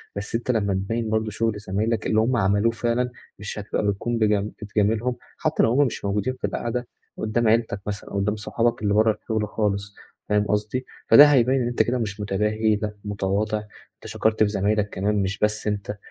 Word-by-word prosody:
بس 100 +2 -4
أنت 120 +2 0
لمّا 100 -4 0
تبيّن 110 +4 -2
برضه 110 0 0
شغل 110 0 -1
زمايلك 105 +2 -1
اللي 110 - +2
هُم 120 +3 +2
عملوه 100 +3 +2
فعلًا، 120 +2 0 0.3
مش 105 +1 -5
هتبقى 105 0 -2
بتكون 115 +4 -1
بج 110 -2 +3 0.3
بتجاملهم 110 +3 0 0.2
حتى - - +1
لو 115 - +3
هُم 140 +3 +4
مش 120 - -4
موجودين 105 +5 0
في - - -2
القعدة 120 +1 -3 0.3
قدّام 110 +1 0
عيلتك 110 -3 +1
مثلًا 100 -1 -5
أو - - -3
قدّام 105 +2 0
صحابك 115 +2 -1
اللي 100 - +2
برّه 110 +1 +4
الشغل 110 -2 -1
خالص، 100 -1 -2 0.3
فاهم 105 0 +2
قصدي، 105 +5 -1 0.2
فده 145 - +10
هيبيّن 130 -2 +4
إن 120 - 0
أنت 120 - +2
كده 125 +1 -1
مش 105 -3 -3
متباهي 105 +2 +1
لأ، 105 0 -4
متواضع 105 +1 -1 0.4
أنت - - -21
شكرت 110 0 +1
في 105 - +2
زمايلك 105 +1 0
كمان 100 +3 -1
مش 95 +1 -3
بس 105 +1 0
أنت، 105 0 -3
110 Hz, 195 wpm, -24 LUFS, 105-115 Hz, 0.4 s, فده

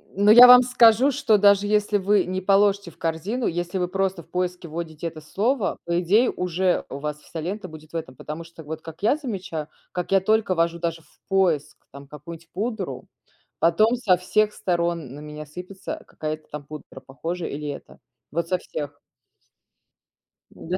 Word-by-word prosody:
но 205 +2 +5
я 245 +2 +11
вам 250 0 +9
скажу, 245 +1 +5
что, 255 -6 +3
даже 200 0 +4
если 210 0 +2
вы 200 0 +2
не 185 +1 -3
положите 200 -1 +3
в - - -19
корзину, 180 +10 -2
если 175 +2 -2
вы 180 -1 0
просто 190 -2 -2
в - - -29
поиске 180 -1 -3
вводите 160 0 -6
это 155 -1 -8
слово, 220 - -1
по 170 +1 0
идее 210 +8 +3
уже 180 +1 0
у 135 - -6
вас 150 +1 -4
вся 165 - -8
лента 185 +5 -4
будет 155 -1 -13
в - - -9
этом, 160 -5 -5
потому 155 +5 -7
что, 165 -1 -13
вот 155 +1 -7
как 165 +4 -11
я 255 +7 +3
замечаю, 190 - -5 0.2
как 180 0 -4
я 195 - +5
только 210 -1 +1
ввожу 170 0 0
даже 165 -1 -3
в - - -28
поиск 170 -6 +1
там 140 +1 -12
какую-нибудь 165 +3 -11
пудру, 195 - -4 0.5
потом 215 +9 +3
со 190 -7 +3
всех 210 +4 +1
сторон 170 -6 -2
на 145 - -9
меня 150 0 -8
сыпется 180 +5 -8
какая-то 155 0 -6
там 150 -1 -7
пудра, 150 +1 -10
похожая 165 +6 -5
или 150 +1 -5
эта. 140 - -9 0.3
Вот 170 +2 -2
со 185 - +1
всех. 145 -4 -7 1.5
Да. 180 +3 -4
175 Hz, 180 wpm, -24 LUFS, 160-200 Hz, 1.5 s, я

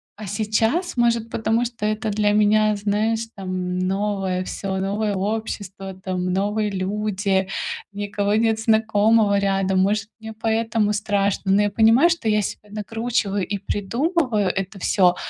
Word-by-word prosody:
А 215 0 -8
сейчас, 220 - 0
может, 235 -2 +1
потому 225 +2 0
что 230 -3 -3
это 215 0 -1
для 205 0 +2
меня, 215 0 +3
знаешь, 210 +2 0
там, 185 -2 -3
новое 190 -1 -1
всё, 190 +1 -4
новое 200 +2 -1
общество, 195 -2 -4
там, 185 -1 -3
новые 210 +3 0
люди, 195 0 -1 0.5
никого 205 0 -1
нет 220 0 +2
знакомого 220 -1 +3
рядом, 195 -1 +1
может, 200 +2 +1
мне 220 0 -8
поэтому 225 -1 0
страшно, 200 -2 0
но 200 +2 +4
я 205 - 0
понимаю, 230 +10 +5
что 335 -10 -1
я 210 -1 +2
себя 210 - -6
накручиваю 215 -1 -2
и 200 +2 -2
придумываю 230 - 0
это 195 +1 -3
всё, 180 -1 +3
210 Hz, 140 wpm, -22 LUFS, 195-220 Hz, 0.5 s, понимаю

